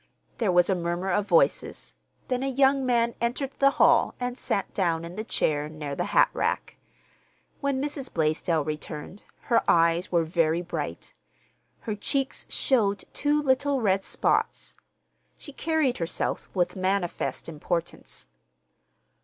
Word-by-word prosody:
There 220 Hz, -6 st, +2 dB
was 175 Hz, 0 st, +4 dB
a 195 Hz, -, +2 dB
murmur 175 Hz, +1 st, -2 dB
of 205 Hz, +3 st, 0 dB
voices, 170 Hz, -3 st, +1 dB, 0.3 s
then 250 Hz, -1 st, -1 dB
a 270 Hz, -, -1 dB
young 270 Hz, +1 st, +3 dB
man 235 Hz, -1 st, +2 dB
entered 250 Hz, +3 st, -1 dB
the 275 Hz, -, +6 dB
hall -, -, +4 dB
and 245 Hz, 0 st, -2 dB
sat 200 Hz, -5 st, -2 dB
down 170 Hz, -4 st, 0 dB
in 170 Hz, +1 st, -9 dB
the 215 Hz, -, -4 dB
chair 150 Hz, -8 st, 0 dB
near 150 Hz, -2 st, -6 dB
the -, -, -2 dB
hatrack. -, -, +1 dB, 0.8 s
When 280 Hz, -2 st, -1 dB
Mrs. 280 Hz, -1 st, -4 dB
Blaisdell 160 Hz, 0 st, 0 dB
returned 155 Hz, +5 st, -6 dB, 0.2 s
her 235 Hz, -, +2 dB
eyes 170 Hz, +1 st, +3 dB
were 170 Hz, -2 st, +3 dB
very 165 Hz, +1 st, +1 dB
bright. 175 Hz, -, -5 dB, 0.7 s
Her 220 Hz, -, -3 dB
cheeks 270 Hz, +6 st, -2 dB
showed 205 Hz, -7 st, +1 dB
two 295 Hz, +1 st, +1 dB
little 275 Hz, 0 st, +2 dB
red 195 Hz, -4 st, +1 dB
spots. -, -, 0 dB, 0.6 s
She 290 Hz, -, -11 dB
carried 315 Hz, -4 st, 0 dB
herself 165 Hz, 0 st, -2 dB
with 180 Hz, -1 st, +1 dB
manifest 185 Hz, -1 st, -2 dB
importance. 165 Hz, +2 st, -4 dB
195 Hz, 135 wpm, -26 LUFS, 170-260 Hz, 0.8 s, the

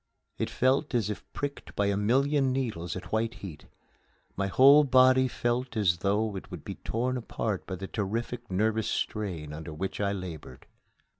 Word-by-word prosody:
It -, -, -1 dB
felt 135 Hz, +2 st, +1 dB
as 110 Hz, -3 st, +1 dB
if 105 Hz, -, -6 dB
pricked 145 Hz, -1 st, -5 dB
by 100 Hz, -, +1 dB
a 100 Hz, 0 st, +1 dB
million 135 Hz, +6 st, +2 dB
needles 110 Hz, -10 st, -2 dB
at 95 Hz, -, -8 dB
white 115 Hz, +2 st, 0 dB
heat. 90 Hz, -7 st, -9 dB, 0.7 s
My 100 Hz, 0 st, -1 dB
whole 140 Hz, +8 st, +7 dB
body 130 Hz, -1 st, +5 dB
felt 120 Hz, 0 st, -2 dB
as 90 Hz, -5 st, +2 dB
though 105 Hz, +2 st, 0 dB
it 95 Hz, -, -7 dB
would 90 Hz, -5 st, -8 dB
be -, -, -4 dB
torn 125 Hz, +3 st, -2 dB
apart 110 Hz, -4 st, -3 dB
by 95 Hz, -, -3 dB
the 95 Hz, +2 st, -6 dB
terrific 115 Hz, +4 st, -3 dB
nervous 110 Hz, +3 st, +1 dB
strain 85 Hz, -9 st, -3 dB
under 80 Hz, +1 st, -7 dB
which 95 Hz, +5 st, -3 dB
I 100 Hz, -1 st, +1 dB
labored. 85 Hz, -9 st, -7 dB
110 Hz, 170 wpm, -29 LUFS, 95-125 Hz, 0.7 s, whole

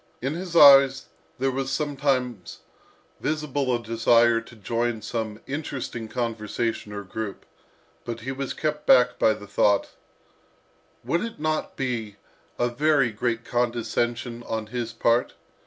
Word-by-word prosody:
In 135 Hz, +4 st, -2 dB
his 175 Hz, +1 st, -6 dB
eyes, 135 Hz, -3 st, +7 dB, 0.3 s
there 135 Hz, +1 st, 0 dB
was 135 Hz, +1 st, -2 dB
sometimes 135 Hz, -, -1 dB, 0.6 s
visible 145 Hz, -4 st, -1 dB
a -, -, +1 dB
desire 115 Hz, 0 st, +3 dB
to 115 Hz, -, -15 dB
join 115 Hz, +1 st, -2 dB
some 110 Hz, -2 st, -4 dB
interesting 135 Hz, -5 st, -5 dB
conversation 115 Hz, -2 st, -3 dB
or 100 Hz, 0 st, -5 dB
group, 100 Hz, +1 st, -6 dB, 0.6 s
but 115 Hz, -1 st, -6 dB
he 130 Hz, +4 st, -4 dB
was 135 Hz, 0 st, -4 dB
kept 150 Hz, -1 st, -3 dB
back 125 Hz, 0 st, +5 dB
by 110 Hz, -, +4 dB
the 105 Hz, -1 st, -10 dB
thought, 100 Hz, 0 st, +2 dB, 1.1 s
"Would 145 Hz, +8 st, 0 dB
it 230 Hz, -6 st, -5 dB
not 155 Hz, 0 st, -2 dB
be 115 Hz, -6 st, -3 dB, 0.4 s
a 120 Hz, -, +2 dB
very 140 Hz, 0 st, +2 dB
great 115 Hz, +1 st, -2 dB
condescension 120 Hz, 0 st, -1 dB
on 110 Hz, -1 st, -2 dB
his 120 Hz, -2 st, -3 dB
part? 115 Hz, +1 st, +1 dB
120 Hz, 135 wpm, -25 LUFS, 115-135 Hz, 1.1 s, eyes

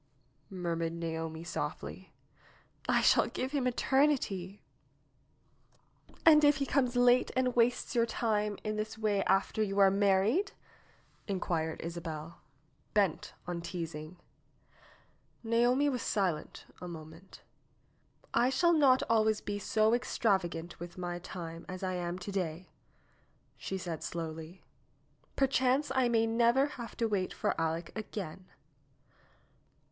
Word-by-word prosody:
murmured 170 Hz, -3 st, -2 dB
Naomi 165 Hz, -1 st, -4 dB
softly. 175 Hz, -, -5 dB, 0.8 s
"I -, -, +4 dB
shall -, -, +5 dB
give 260 Hz, +1 st, -3 dB
him 275 Hz, -4 st, 0 dB
eternity 245 Hz, -8 st, +1 dB, 0.8 s
!" -, -, -30 dB
"And 305 Hz, -2 st, +8 dB
if 290 Hz, -1 st, +5 dB
he 275 Hz, -, -1 dB
comes 255 Hz, -2 st, +1 dB
late 245 Hz, 0 st, +5 dB
and 255 Hz, -1 st, +1 dB
wastes 240 Hz, +1 st, +2 dB
your 235 Hz, -1 st, +2 dB
time 210 Hz, -3 st, 0 dB
in 215 Hz, 0 st, -2 dB
this 215 Hz, +1 st, -4 dB
way 210 Hz, -3 st, +1 dB
after 195 Hz, +2 st, +1 dB
you 200 Hz, -2 st, -1 dB
are 195 Hz, -1 st, +6 dB
married?" 200 Hz, -, +2 dB, 0.7 s
inquired 170 Hz, -5 st, -2 dB
Isabel, 165 Hz, -1 st, -6 dB, 0.5 s
bent 195 Hz, -6 st, +1 dB
on 175 Hz, -1 st, -4 dB
teasing. 165 Hz, -1 st, -6 dB, 1.3 s
Naomi 240 Hz, +5 st, +3 dB
was 255 Hz, -4 st, -1 dB
silent 180 Hz, -7 st, -2 dB, 0.2 s
a 180 Hz, -, -6 dB
moment. 165 Hz, +2 st, -11 dB, 0.9 s
"I 240 Hz, +2 st, +4 dB
shall 340 Hz, +7 st, +3 dB
not 275 Hz, -5 st, +5 dB
always 220 Hz, -1 st, +3 dB
be 205 Hz, 0 st, -4 dB
so 215 Hz, +2 st, +2 dB
extravagant 190 Hz, -8 st, 0 dB
with 175 Hz, +1 st, -8 dB
my 175 Hz, -1 st, -4 dB
time 170 Hz, -2 st, -7 dB
as 185 Hz, +1 st, -6 dB
I 185 Hz, 0 st, -1 dB
am 175 Hz, 0 st, -3 dB
to 185 Hz, +2 st, -6 dB
day," 180 Hz, -2 st, -3 dB, 0.8 s
she 190 Hz, -, -4 dB
said 170 Hz, -4 st, -5 dB
slowly. 165 Hz, +1 st, -6 dB, 0.7 s
"Perchance 270 Hz, +1 st, +2 dB
I 260 Hz, -2 st, +3 dB
may 225 Hz, -1 st, +3 dB
never 235 Hz, +4 st, +3 dB
have 240 Hz, -5 st, -8 dB
to 230 Hz, -, +1 dB
wait 195 Hz, -4 st, -1 dB
for -, -, 0 dB
Aleck 165 Hz, +1 st, -2 dB
again." 190 Hz, -4 st, -6 dB
200 Hz, 125 wpm, -32 LUFS, 170-240 Hz, 1.3 s, And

